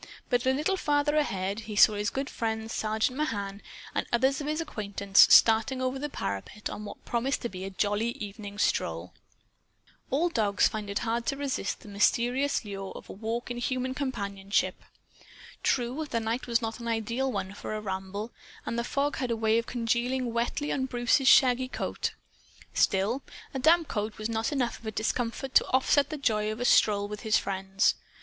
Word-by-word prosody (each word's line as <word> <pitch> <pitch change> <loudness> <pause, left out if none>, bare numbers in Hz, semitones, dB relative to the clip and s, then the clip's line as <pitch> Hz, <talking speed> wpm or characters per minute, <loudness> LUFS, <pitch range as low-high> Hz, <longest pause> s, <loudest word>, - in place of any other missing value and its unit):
But, 245 +1 +2
a - - +5
little 305 +8 0
farther 295 -2 +1
ahead, 200 -9 0
he 215 -1 -7
saw 210 +1 +7
his 210 0 -1
good 270 +1 -3
friend, 220 -2 -3
Sergeant 220 +3 0
Mahan, 200 -8 -2 0.3
and - - -1
others 265 +4 +2
of 290 - -4
his 305 +1 -1
acquaintances, 200 -9 +3
starting 225 +4 +6
over 260 +1 -1
the 295 +2 -3
parapet 100 - -4
on 210 - -6
what - - -10
promised 250 +4 -1
to 235 - -1
be 185 -1 -6
a - - -4
jolly 205 +4 0
evening 205 -1 -8
stroll. - - -1 1.0
All 310 +6 +2
dogs 210 -9 +2
find 215 -2 -5
it 200 - -2
hard 235 +1 -1
to 275 - 0
resist 275 -8 -2
the - - -14
mysterious 240 +6 +1
lure 195 -1 -6
of - - -9
a - - -7
walk 230 +4 -4
in 240 - -4
human 255 +1 -1
companionship. 200 -7 -2 0.8
True, 255 +5 0
the 230 - 0
night 230 +3 -2
was 235 0 +1
not 225 +1 -3
an 235 - -6
ideal 230 +4 -1
one 190 -5 -3
for 215 - -5
a - - -2
ramble, 200 +2 -5 0.3
and 235 - -2
the - - 0
fog 285 +4 -1
had 255 - -2
a 230 - 0
way 220 0 +3
of 230 - -5
congealing 240 +1 -1
wetly 240 +5 -1
on 260 -1 -1
Bruce's 245 +2 +2
shaggy 255 -1 +6
coat. - - -3 0.6
Still, 205 +8 +2 0.3
a 265 - -2
damp 325 +4 +4
coat 210 0 -3
was 215 +1 -3
not 225 +2 -1
enough 255 -5 -1
of 225 - -10
a - - -1
discomfort 230 +4 -2
to - - +5
offset 275 +2 +3
the 310 - -4
joy 215 -6 +1
of 215 - -6
a 245 - -1
stroll 205 -4 +4
with 210 0 -6
his 215 -1 +2
friends. 195 +1 +1
230 Hz, 190 wpm, -28 LUFS, 210-260 Hz, 1.0 s, saw